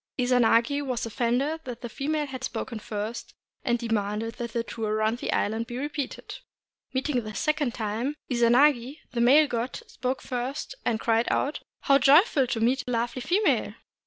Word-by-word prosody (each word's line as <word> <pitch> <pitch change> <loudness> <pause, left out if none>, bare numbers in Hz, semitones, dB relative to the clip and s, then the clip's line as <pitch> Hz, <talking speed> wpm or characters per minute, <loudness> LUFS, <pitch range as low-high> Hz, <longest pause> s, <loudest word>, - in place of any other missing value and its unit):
Izanagi 245 +2 +3
was 250 -4 -2
offended 245 +8 0
that 245 -2 -7
the 240 - -4
female 295 +5 -2
had 260 -2 -7
spoken 235 -4 -4
first, 215 +1 -5 0.3
and 240 -2 +1
demanded 225 -1 -2
that 235 -1 -4
the 235 - 0
tour 220 -2 -3
round 220 +2 0
the - - -2
island 220 +2 0
be 240 0 -5
repeated. 285 0 -5 0.5
Meeting 260 -2 -1
the 215 -1 -7
second 300 -5 0
time, 230 +6 -2
Izanagi, 250 +3 +3
the 235 - -1
male 280 +6 +6
god, 240 0 -3
spoke 255 +1 -3
first, 255 - -4
and 225 -2 0
cried 230 +1 +2
out, 290 - 0
— - - -67
"How 275 -1 +4
joyful 285 - +5
to 235 - -2
meet 250 +5 +2
a - - -3
lovely 240 +2 -1
female!" 365 - +1
245 Hz, 170 wpm, -27 LUFS, 230-275 Hz, 0.5 s, male